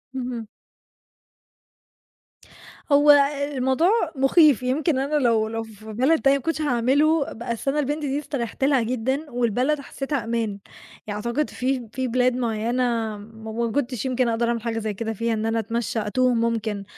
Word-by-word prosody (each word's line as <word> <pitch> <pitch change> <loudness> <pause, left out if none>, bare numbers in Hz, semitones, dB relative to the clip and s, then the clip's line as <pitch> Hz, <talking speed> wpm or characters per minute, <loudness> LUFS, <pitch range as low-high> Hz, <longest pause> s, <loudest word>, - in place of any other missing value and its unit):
اهم. 245 -3 -4 2.4
هو 290 +1 +7 0.4
الموضوع 265 +7 +2 0.3
مخيف، 270 - +4
يمكن 265 +2 +1
أنا 280 +3 -1
لو 230 -6 +2
لو 225 +1 -3
في 220 0 -11
بلد 270 +8 +3
تانية 275 0 +4
ما - - -7
كنتش 325 -1 -1
هاعمله، 285 +4 +2
بس 235 +2 -5
أنا 280 +2 +1
البنت 295 +2 -1
دي 275 +1 -1
استريحت 270 -4 -4
لها 270 -2 +3
جدًا 255 +6 -2
والبلد 245 +5 +1
حسيتها 275 -1 -4
أمان، 230 -3 -2 0.5
يعني 205 -1 -3
أعتقد 255 +6 0
في 255 -2 -2
في 260 0 -2
بلاد 250 +1 +2
معيّنة 230 -1 -1
م 220 +1 -10
ما 230 - -2
كنتش 255 -2 -2
يمكن 255 -1 +1
أقدر 230 +1 0
أعمل 235 -1 -1
حاجة 225 -1 -2
زي 215 -1 -3
كده 225 +2 -4
فيها 230 +2 -1
إن 220 0 -2
أنا 225 0 0
أتمشى 225 +1 -2
أتوه 255 +3 +2
ممكن، 225 -3 -1
245 Hz, 160 wpm, -23 LUFS, 225-275 Hz, 2.4 s, هو